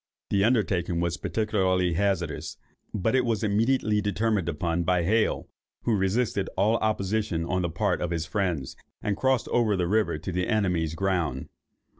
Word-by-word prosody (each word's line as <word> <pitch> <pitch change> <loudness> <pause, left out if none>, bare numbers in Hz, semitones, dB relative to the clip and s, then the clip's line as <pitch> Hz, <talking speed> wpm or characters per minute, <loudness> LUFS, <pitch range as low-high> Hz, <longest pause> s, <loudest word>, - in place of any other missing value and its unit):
The 100 -1 +3
undertaking 100 -7 +1
was 85 0 -1
particularly 95 -5 +1
hazardous; 90 -3 -1 0.3
but 105 +3 0
it 130 -1 +3
was 115 -4 0
immediately 110 0 +2
determined 105 -3 0
upon 85 +2 -1
by 90 0 +1
Hale, 110 +5 +1 0.4
who 115 - +2
resisted 100 +1 0
all 105 +4 +3
opposition 105 -5 -1
on 95 +2 0
the 85 - -1
part 85 - 0
of 85 - -1
his 85 -2 -2
friends, 90 -9 -2 0.3
and 105 - 0
crossed 130 0 +1
over 115 -4 +2
the 90 -1 0
river 100 -5 +1
to 80 +5 -5
the 90 +1 -1
enemy's 90 -8 0
ground. 85 -8 -1
95 Hz, 160 wpm, -27 LUFS, 85-110 Hz, 0.4 s, The